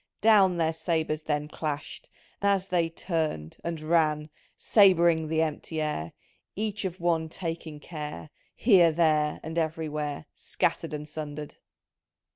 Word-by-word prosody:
" - - -61
Down 200 -5 +5
their 165 -1 +1
sabres 160 -2 -1
then 150 -1 -2
Clashed, 150 -1 -5 0.3
as 200 -1 +1
they 170 -2 +1
turn'd 160 - -3
— - - -27
and 170 -1 -3
ran 155 -1 +1
— - - -37
Sab'ring 170 -6 +5
the 160 +1 +2
empty 160 +1 -4
air, 115 - -2 0.4
Each 210 -1 -2
of 185 -1 -4
one 165 -2 +1
taking 165 -3 -5
care, 150 - -7 0.2
Here, 185 -8 +5
there, 155 -2 +2
and 160 +2 -2
everywhere 155 -2 -3
Scattered - - -2
and 150 0 -6
sundered. 150 -1 -7
160 Hz, 140 wpm, -28 LUFS, 150-170 Hz, 0.4 s, Down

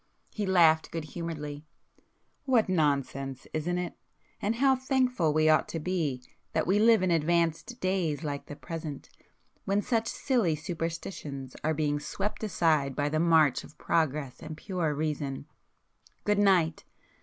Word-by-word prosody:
He 210 -2 -2
laughed 165 -4 +5
good 165 -1 -4
humouredly. 150 -3 -6 0.8
"What 250 -5 +3
nonsense, 140 -6 0
isn't 170 +3 -1
it!—and 180 +4 -5
how 265 +2 +4
thankful 255 - +1
we 155 +1 +3
ought 155 0 +4
to 165 - -4
be 150 -7 -2 0.3
that - - +1
we 195 +4 +3
live 220 -2 +5
in 185 - +2
advanced 170 +7 +1
days 180 -5 0
like 145 -2 -4
the 145 - -7
present, 155 -3 -7 0.6
when 200 +1 +1
such 230 -2 0
silly 230 - +1
superstitions 160 -4 -5
are 155 0 +1
being 145 -1 0
swept 200 +9 -4
aside 155 -9 +1
by 145 0 0
the 155 +1 0
march 160 -5 +4
of - - -15
progress 150 -5 0
and 155 -1 -7
pure 175 -6 -2
Reason! 145 -3 -3 0.8
Good 210 -1 +2
night! 180 -6 +3
165 Hz, 145 wpm, -29 LUFS, 150-190 Hz, 0.8 s, laughed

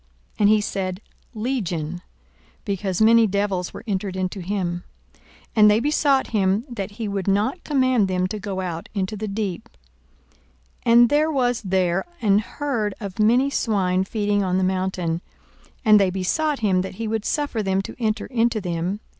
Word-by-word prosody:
And 205 -1 +5
he 215 0 +4
said, 185 -2 -3 0.4
Legion: 180 - -2 0.6
because 195 -1 -1
many 230 0 +6
devils 200 -2 -1
were - - -9
entered 195 -3 -2
into 185 +1 -3
him. 175 -2 -2 0.3
42:008:031 - - -30 0.3
And 210 -1 +8
they 210 +1 +4
besought 285 0 +2
him 200 +1 +1
that 200 -4 -4
he 220 0 -4
would 200 -2 -3
not 205 - +1
command 255 -7 +2
them 185 -1 0
to 215 - -4
go 195 -2 -4
out 170 -3 -5
into 195 +1 -2
the 215 +1 -4
deep. 195 -3 -4 1.1
42:008:032 230 - +3
And 240 0 +7
there 305 +2 +2
was 245 -4 +1
there 185 -2 0
an 205 -2 +3
herd 220 -3 -3
of 200 -2 -7
many 245 +6 +3
swine 190 -7 +1
feeding 205 0 0
on 185 -1 0
the 190 - +1
mountain: 185 -3 -1 0.6
and 215 -1 +7
they 195 -2 +3
besought 265 - -1
him 190 -4 +2
that 190 0 -6
he 225 +2 -4
would 220 -1 -1
suffer 290 -6 -1
them 195 -1 0
to - - -8
enter 220 -2 -1
into 235 -2 +1
them. 180 +2 -3
205 Hz, 170 wpm, -23 LUFS, 185-225 Hz, 1.1 s, And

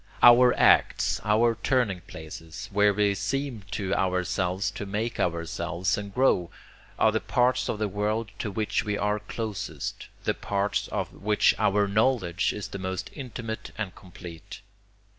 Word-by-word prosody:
Our 120 +1 +8
acts, - - +4
our 115 +2 +3
turning 120 -9 +1
places, 80 +1 -9
where 105 +1 +4
we 100 0 +2
seem 120 +4 -2
to 95 -1 -2
ourselves 90 0 0
to 100 - -6
make 110 +4 -2
ourselves 85 +2 -1
and 100 -1 -6
grow, 100 -8 +2 0.5
are - - +4
the - - +1
parts 125 +1 +1
of - - -1
the 105 0 0
world 105 +2 -2
to 105 - -2
which 105 +2 -1
we 105 -1 -1
are 105 +1 0
closest, 105 -1 -5 0.2
the - - +1
parts 100 0 -1
of - - -3
which 105 +1 +3
our 105 -1 +3
knowledge 100 -3 +1
is 105 - -6
the 100 - -6
most 95 0 -4
intimate 120 -5 -6
and 100 -4 -3
complete. 85 -3 -11
105 Hz, 150 wpm, -27 LUFS, 95-110 Hz, 0.5 s, Our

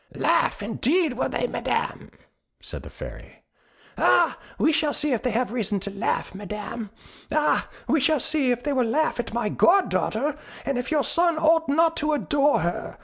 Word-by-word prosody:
"Laugh, - - +1
indeed, 285 - +1
will 250 - -1
they, - - -1
Madam?" - - -2 0.5
said - - -8
the - - -11
Fairy. - - -11 0.6
"Ah, - - +4 0.2
we 315 - +3
shall 300 -1 +1
see 300 -2 0
if 235 - -1
they 250 - 0
have 235 0 -1
reason 215 -4 -1
to 200 +2 -6
laugh, 195 - -2
Madam. 210 +2 -6 0.4
Ah, 300 0 +1 0.2
we 315 - +3
shall 300 +2 +2
see 285 0 0
if 245 0 0
they 290 - -1
will 260 -2 +2
laugh 300 +3 0
at 240 - -3
my 235 -1 -1
goddaughter, 300 - +2 0.3
and 275 -3 -1
if 250 - -4
your 300 -3 +2
son 340 +1 +2
ought 320 -1 +3
not 325 +3 +3
to 305 0 +1
adore 290 - +2
her. 170 +1 -3
280 Hz, 180 wpm, -24 LUFS, 230-315 Hz, 0.6 s, Ah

